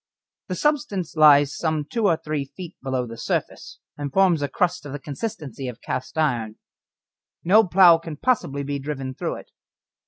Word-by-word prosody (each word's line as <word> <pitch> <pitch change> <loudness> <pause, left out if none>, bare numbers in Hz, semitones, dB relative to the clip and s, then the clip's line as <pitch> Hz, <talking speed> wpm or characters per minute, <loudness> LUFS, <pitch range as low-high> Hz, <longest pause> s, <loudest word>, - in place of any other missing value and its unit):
The 185 - -3
substance 275 - -1
lies 145 -2 +6
some 155 -2 -1
two 220 +7 0
or 165 -4 +3
three 155 -3 -3
feet 175 +5 -10
below 130 -1 -2
the 115 -1 -9
surface, - - -3 0.2
and 145 -1 -4
forms 180 -2 +3
a 145 - 0
crust 180 +5 -1
of 145 -2 -8
the 145 - -5
consistency 140 - -6
of 125 -3 -7
cast 130 - -5
iron. 120 -8 0 0.9
No 210 +6 +6
plough 175 -2 +7
can 165 -2 -8
possibly 145 - 0
be 140 0 -3
driven 135 -2 -5
through - - -3
it. - - -12
150 Hz, 175 wpm, -23 LUFS, 140-180 Hz, 0.9 s, plough